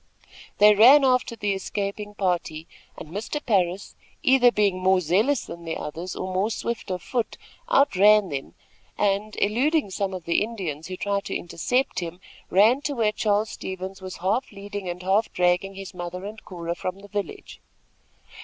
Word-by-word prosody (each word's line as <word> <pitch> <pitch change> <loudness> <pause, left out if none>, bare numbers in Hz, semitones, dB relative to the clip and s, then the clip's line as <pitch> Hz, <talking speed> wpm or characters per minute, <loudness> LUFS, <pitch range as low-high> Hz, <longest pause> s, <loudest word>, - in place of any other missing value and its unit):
They 210 +1 +7
ran 260 +7 +8
after 255 -2 +2
the 205 -2 -1
escaping 205 +1 -4
party, 175 -5 -2 0.3
and 155 - -9
Mr. 215 - -3
Parris, 195 -7 0 0.3
either 260 -4 +5
being 200 -4 +1
more 190 0 +3
zealous 205 - +1
than 170 - -9
the 165 -1 -4
others, 165 +5 -6
or 185 0 -4
more 190 +4 +1
swift 235 -1 -4
of 180 -2 -3
foot, 240 -4 -2 0.3
outran 210 - +5
them 135 -2 -5 0.4
and, 205 +1 0
eluding 250 +4 +1
some 190 0 -2
of 180 -3 -8
the 170 - +2
Indians, 185 -9 -4
who 185 0 -6
tried 200 +1 -1
to - - -4
intercept 250 +10 -1
him, 175 0 -6 0.3
ran 220 +8 +5
to 290 - -2
where 220 -3 +2
Charles 210 0 0
Stevens 190 +1 -6
was 185 -1 -7
half 240 +7 0
leading 200 -2 -6
and 175 +1 -6
half 195 +4 +2
dragging 180 +2 +1
his 195 -1 -8
mother 180 +1 -6
and 215 +2 -8
Cora 170 -2 -5
from 185 +2 -5
the 205 - -12
village. 205 - -6
200 Hz, 170 wpm, -25 LUFS, 180-215 Hz, 0.4 s, ran